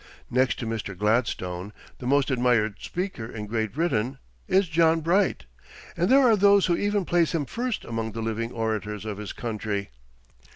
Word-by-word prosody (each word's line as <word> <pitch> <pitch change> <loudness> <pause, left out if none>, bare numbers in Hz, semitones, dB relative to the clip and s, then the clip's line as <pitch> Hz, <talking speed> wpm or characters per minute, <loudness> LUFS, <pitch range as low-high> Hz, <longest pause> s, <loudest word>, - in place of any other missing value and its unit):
Next 130 +1 +2
to 120 - -4
Mr. 110 -4 -4
Gladstone, 105 -3 -1 0.3
the 125 - -5
most 140 +1 +2
admired 120 -4 +2
speaker 180 - -4
in 110 -2 -6
Great 110 -1 -2
Britain 135 -5 0 0.3
is 190 0 +3
John 165 0 +3
Bright, 175 - +1 0.5
and 175 +3 +1
there 270 +2 +6
are 225 - +6
those 200 -1 +5
who 175 - +2
even 205 0 0
place 170 -1 +2
him 150 -3 0
first 240 - -3
among 115 -1 -3
the 115 - -4
living 115 +1 -2
orators 105 -2 -3
of 105 -2 -4
his 105 - -5
country. 105 - -4
120 Hz, 170 wpm, -26 LUFS, 110-170 Hz, 0.5 s, there